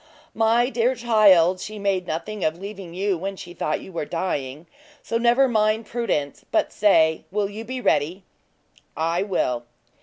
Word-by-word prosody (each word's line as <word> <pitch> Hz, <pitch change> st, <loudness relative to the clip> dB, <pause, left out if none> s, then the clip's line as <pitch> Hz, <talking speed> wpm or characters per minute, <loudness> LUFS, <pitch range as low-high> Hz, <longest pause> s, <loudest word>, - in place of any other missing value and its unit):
"My 230 Hz, +2 st, +3 dB
dear 245 Hz, +1 st, +1 dB
child, 200 Hz, -7 st, +4 dB
she 215 Hz, +3 st, -7 dB
made 195 Hz, -3 st, -1 dB
nothing 190 Hz, +6 st, -4 dB
of 155 Hz, +1 st, 0 dB
leaving 195 Hz, -2 st, -8 dB
you 195 Hz, -1 st, 0 dB
when 195 Hz, +2 st, -4 dB
she 175 Hz, -2 st, -10 dB
thought 155 Hz, -3 st, -2 dB
you -, -, -11 dB
were 170 Hz, -, -3 dB
dying; 150 Hz, -3 st, -3 dB, 0.4 s
so 230 Hz, -, -1 dB
never 240 Hz, +3 st, +4 dB
mind 215 Hz, -1 st, +1 dB
Prudence, 210 Hz, -, -2 dB
but 325 Hz, -, +1 dB
say, 160 Hz, -6 st, +3 dB
will 205 Hz, 0 st, -1 dB
you 215 Hz, +2 st, -7 dB
be 255 Hz, +3 st, -5 dB
ready?" 170 Hz, +1 st, +1 dB, 0.7 s
"I 165 Hz, +2 st, 0 dB
will." 130 Hz, -, -1 dB
195 Hz, 160 wpm, -23 LUFS, 170-225 Hz, 0.7 s, child